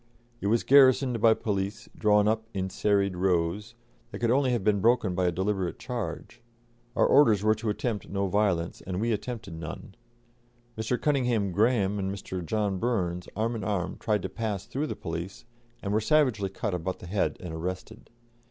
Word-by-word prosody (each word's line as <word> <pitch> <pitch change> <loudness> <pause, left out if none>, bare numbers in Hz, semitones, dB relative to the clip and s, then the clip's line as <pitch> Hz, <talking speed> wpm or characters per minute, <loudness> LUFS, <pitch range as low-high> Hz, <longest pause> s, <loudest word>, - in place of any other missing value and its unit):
It 100 - -1
was 115 +3 +2
garrisoned 130 -3 +5
by 110 -1 +6
police, 100 -1 -3
drawn 105 -1 +3
up 110 +1 0
in 95 -1 -2
serried 100 -2 +1
rows, 95 +4 0 0.3
that - - -7
could 115 -1 +1
only 130 0 +3
have 120 -5 0
been 100 -1 +2
broken 115 -4 +3
by 90 0 +1
a - - +2
deliberate 95 0 -1
charge. 120 -1 -6 0.5
Our - - +4
orders 115 -8 +5
were 110 0 +4
to 110 +1 -3
attempt 105 0 -3
no 100 0 -1
violence, 95 -4 0
and 90 0 -4
we 115 +2 0
attempted 110 -2 -4
none. 80 +3 -7 0.8
Mr. 110 +3 -1
Cunninghame 120 -9 +1
Graham 105 0 +2
and 95 0 -2
Mr. 95 -2 -5
John 100 +1 -1
Burns, 90 -7 -1
arm 115 +2 0
in 110 - -4
arm, 95 -4 -2
tried 105 -4 0
to - - -3
pass 105 -5 -3
through 145 +3 -3
the - - -4
police, 85 +3 -6 0.4
and 100 -1 -2
were 110 - +2
savagely 125 -7 +2
cut 100 +1 -3
about 90 +1 -3
the - - -11
head 95 +3 -1
and 90 -3 -7
arrested. 90 +3 -6
105 Hz, 180 wpm, -28 LUFS, 95-115 Hz, 0.8 s, by